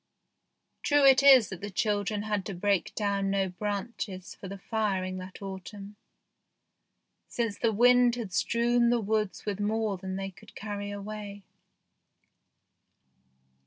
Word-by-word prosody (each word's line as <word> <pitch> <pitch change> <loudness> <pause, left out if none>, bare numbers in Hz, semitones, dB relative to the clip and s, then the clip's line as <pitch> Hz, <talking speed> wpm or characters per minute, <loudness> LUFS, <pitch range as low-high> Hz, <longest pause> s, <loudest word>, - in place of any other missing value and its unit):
True 290 -1 +3
it 270 0 +7
is 270 -5 +7
that 190 -3 -8
the 205 - -5
children 205 +1 -1
had 210 -2 -1
to 200 - -5
break 200 +1 0
down 200 -2 0
no 195 -1 +1
branches 200 0 -5
for 195 - -10
the 200 +1 -7
firing 195 -3 -2
that 185 +2 -10
autumn, 195 +1 -8 1.3
since 230 -4 -2
the 230 - +2
wind 245 +2 +5
had 220 -6 -6
strewn 235 +3 +2
the 240 0 +2
woods 215 -1 -1
with 205 -2 -3
more 215 -1 0
than 190 0 -5
they 195 0 -4
could - - -18
carry 205 -1 -5
away. 205 0 -7
205 Hz, 135 wpm, -28 LUFS, 195-225 Hz, 1.3 s, it